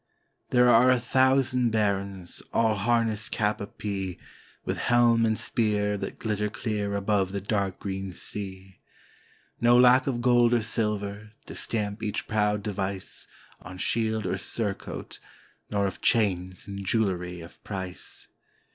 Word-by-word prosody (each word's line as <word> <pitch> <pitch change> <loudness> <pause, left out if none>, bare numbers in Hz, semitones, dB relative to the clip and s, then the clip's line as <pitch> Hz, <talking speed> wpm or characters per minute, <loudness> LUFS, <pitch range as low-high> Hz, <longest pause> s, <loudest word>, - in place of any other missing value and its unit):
There 125 0 +5
are 120 +1 +6
a 130 -1 +4
thousand 130 0 +3
Barons, 100 -4 -1
all 115 -1 +3
harnessed 110 0 0
cap 105 0 0
a 100 - -4
pie. 95 -3 -4 0.5
With - - -2
helm 120 -1 +4
and 110 -1 +1
spear 105 -2 +1
that 100 - -5
glitter 105 -1 -1
clear 105 -2 -2
above 100 -1 +1
the 100 - -2
dark 100 -2 -1
green 95 -1 -4
sea, 95 0 -7 0.4
— - - -33
No 120 +1 +6
lack 125 +2 +6
of 125 -3 0
gold 120 -1 +4
or 115 - +1
silver, 105 -1 -2
to - - -9
stamp 105 -1 -2
each 105 -2 -3
proud 105 -1 +1
device 95 -2 -2 0.3
On 90 +1 -9
shield 110 +1 0
or 90 - -1
surcoat, 105 -4 -4 0.3
— - - -35
nor 100 -1 +1
of 95 - -4
chains 95 -5 +1
and 100 0 -6
jewelry 95 -4 -1
of 85 - -14
price. 95 -3 -7
105 Hz, 145 wpm, -27 LUFS, 100-115 Hz, 0.5 s, are